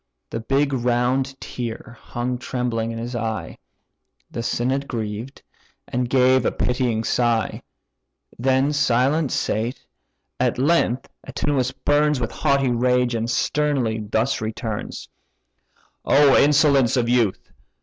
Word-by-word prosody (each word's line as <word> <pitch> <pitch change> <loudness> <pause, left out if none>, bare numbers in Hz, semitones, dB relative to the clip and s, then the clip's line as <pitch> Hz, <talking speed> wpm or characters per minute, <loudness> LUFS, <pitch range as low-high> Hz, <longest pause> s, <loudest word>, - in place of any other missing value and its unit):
The - - -3
big 135 +4 0
round 125 +2 0
tear 120 0 -6
hung 120 +1 -3
trembling 120 -3 -2
in 115 - -5
his 120 +2 -5
eye: 110 -1 -4 0.7
The 115 - -4
synod 130 +4 -1
grieved, 115 +2 -5 0.4
and 125 0 -2
gave 130 0 +4
a - - +1
pitying 125 -3 0
sigh, 115 -3 0 0.8
Then 130 +3 +2
silent 140 +1 +2
sate—at 115 +4 -3
length 135 -2 +1 0.2
Antinous 135 -4 -1
burns 150 0 +1
With 115 -2 -2
haughty 140 -3 +1
rage, 125 0 +2
and 115 0 -2
sternly 130 -3 0
thus 110 +4 -1
returns: 110 0 -5 1.0
"O 140 -1 +5
insolence 140 -3 +4
of 120 -1 +1
youth! 120 -5 0
125 Hz, 115 wpm, -22 LUFS, 115-135 Hz, 1.0 s, O